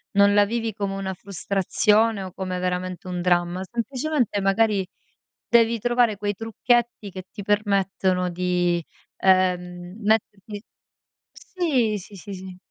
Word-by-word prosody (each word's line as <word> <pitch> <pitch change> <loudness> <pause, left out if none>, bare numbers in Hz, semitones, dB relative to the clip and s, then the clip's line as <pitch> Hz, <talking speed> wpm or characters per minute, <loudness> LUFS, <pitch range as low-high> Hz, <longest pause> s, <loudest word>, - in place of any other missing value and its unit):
non 200 0 +6
la 205 0 +6
vivi 225 0 -2
come 200 -1 -3
una 190 -1 -3
frustrazione 200 +3 +1
o 185 - -7
come 185 -1 -4
veramente 180 0 -3
un 180 -1 -3
dramma. 175 0 +1
Semplicemente 245 0 -1
magari 195 -1 +2 0.6
devi 230 -1 +4
trovare 240 -2 +2
quei 205 -1 -1
trucchetti 225 0 0
che 185 0 -8
ti 205 - -8
permettono 195 -3 +1
di, 175 -1 0 0.3
ehm, 180 -1 +1
metterti 205 -1 -1 0.7
Sì, 265 - -1
sì, 200 +2 -13
sì, 200 +2 -9
sì. 185 -1 -9
200 Hz, 130 wpm, -24 LUFS, 185-220 Hz, 0.7 s, non